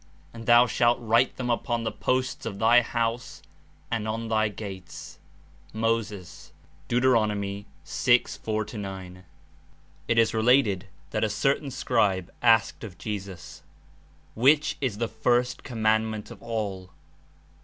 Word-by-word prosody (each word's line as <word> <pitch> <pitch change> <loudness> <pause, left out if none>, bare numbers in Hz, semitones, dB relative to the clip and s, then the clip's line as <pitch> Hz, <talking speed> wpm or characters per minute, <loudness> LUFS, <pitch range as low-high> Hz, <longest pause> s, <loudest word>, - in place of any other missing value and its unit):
And 115 -1 -10
thou 120 +1 +7
shalt 120 0 +2
write 120 +2 +2
them 125 -1 -1
upon 120 0 -1
the 110 - -2
posts 130 +2 -1
of 100 -3 -5
thy 115 +3 +5
house 115 0 -3 0.5
and 110 -2 -1
on 115 +1 -3
thy 110 -1 +2
gates." 100 -3 -9 0.5
(Moses. 110 -4 -3 0.4
Deut. 125 +1 +1
6.4 110 0 0
9.) 95 -2 -8 0.8
It 115 - +1
Is 115 -1 +4
related 110 -4 +3 0.3
that 110 - -1
a 110 - +2
certain 140 +6 0
scribe 105 -8 0
asked 115 -3 +3
of 100 -5 -8
Jesus: 100 -4 -7 0.7
"Which 145 +6 +3
Is 125 -7 -1
the 115 +1 -1
first 125 +1 0
commandment 110 -2 -1
of 115 - -12
all?" 105 -5 -4
115 Hz, 125 wpm, -26 LUFS, 105-120 Hz, 0.8 s, thou